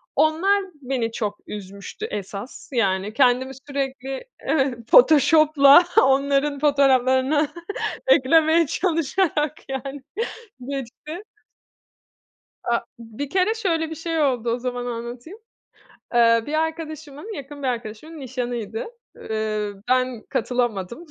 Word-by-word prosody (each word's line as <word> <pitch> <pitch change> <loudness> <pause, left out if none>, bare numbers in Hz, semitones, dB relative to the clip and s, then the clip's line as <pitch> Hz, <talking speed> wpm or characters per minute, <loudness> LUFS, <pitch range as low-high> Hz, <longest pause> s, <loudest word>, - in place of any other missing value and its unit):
Onlar 380 +6 +3 0.2
beni 250 -3 -2
çok 205 -2 -3
üzmüştü 200 - -7
esas, 200 +4 -7
yani 195 -2 0
kendimi 260 +1 +3 0.2
sürekli 270 -1 -4
evet. 270 -5 0
Photoshop'la 305 +1 +7 0.2
onların 275 +1 +2
fotoğraflarına 275 0 +3 0.6
eklemeye 320 - +4
çalışarak 325 -2 0 0.2
yani 270 +1 -5 0.7
geçti. 280 - -6 1.4
Aaa, 235 0 +1 0.2
bir 230 +5 -7
kere 385 +5 +2
şöyle 330 -7 -1
bir - - -4
şey 325 0 -3
oldu, 245 -5 +1
o 235 - 0
zaman 245 0 -4
anlatayım. 240 - -7 0.8
Eee, 230 -1 +5
bir 300 - -4
arkadaşımın, 315 +3 -4
yakın 285 +1 -9
bir 265 - 0
arkadaşımın, 245 +6 -5
nişanıydı. 250 - -4 0.3
Eee, 215 -1 -2 0.2
ben 255 -2 +1
katılamadım. 240 - -2
270 Hz, 100 wpm, -23 LUFS, 240-310 Hz, 1.4 s, Photoshop'la